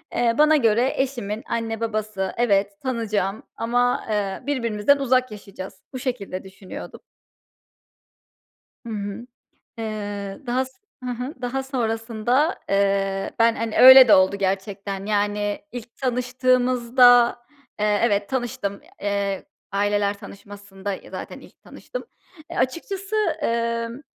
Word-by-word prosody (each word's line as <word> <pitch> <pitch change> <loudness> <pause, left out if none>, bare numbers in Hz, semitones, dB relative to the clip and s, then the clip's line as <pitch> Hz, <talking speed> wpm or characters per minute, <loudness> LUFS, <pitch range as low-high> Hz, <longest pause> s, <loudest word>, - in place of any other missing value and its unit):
Eee, 235 -1 +2
bana 305 +1 +6
göre, 235 -1 +3
"Eşimin 240 -5 -2
anne, 225 -1 -2
babası 215 -4 -2
evet, 200 -4 +2
tanıyacağım 215 -6 -2
ama, 245 +2 +1
eee, 205 -1 -2
birbirimizden 235 -2 +2
uzak 255 -2 +1
yaşayacağız." 200 -2 -9
Bu 255 - -4
şekilde 205 -8 -4
düşünüyordum. 190 0 -10 1.9
Hı - - -7
hı. 205 +2 -5 0.5
Eee, 205 -3 -5
daha 250 +2 +1
s 260 - -14 0.3
Hı 250 - -3
hı. 250 +5 -4
Daha 265 +2 -2
sonrasında, 240 - 0
eee, 195 -1 +1
ben, 230 0 +4
hani, 225 -1 -3
öyle 260 -1 +11
de 210 - +9
oldu 190 +1 +4
gerçekten. 195 0 -3
Yani, 205 0 0
ilk 240 -1 -9
tanıştığımızda, 250 -1 +3 0.4
eee, 210 0 +2
evet, 205 -3 +1
tanıştım. 235 -6 -3 0.2
Eee, 200 -1 -1 0.3
aileler 205 0 +1
tanışmasında, 200 -1 -8
ya, - - -12
zaten - - -7
ilk - - -18
tanıştım. - - -8 0.5
E, - - -6
açıkçası, 385 +9 -2 0.3
emm, 230 +1 -1
225 Hz, 120 wpm, -23 LUFS, 200-250 Hz, 1.9 s, öyle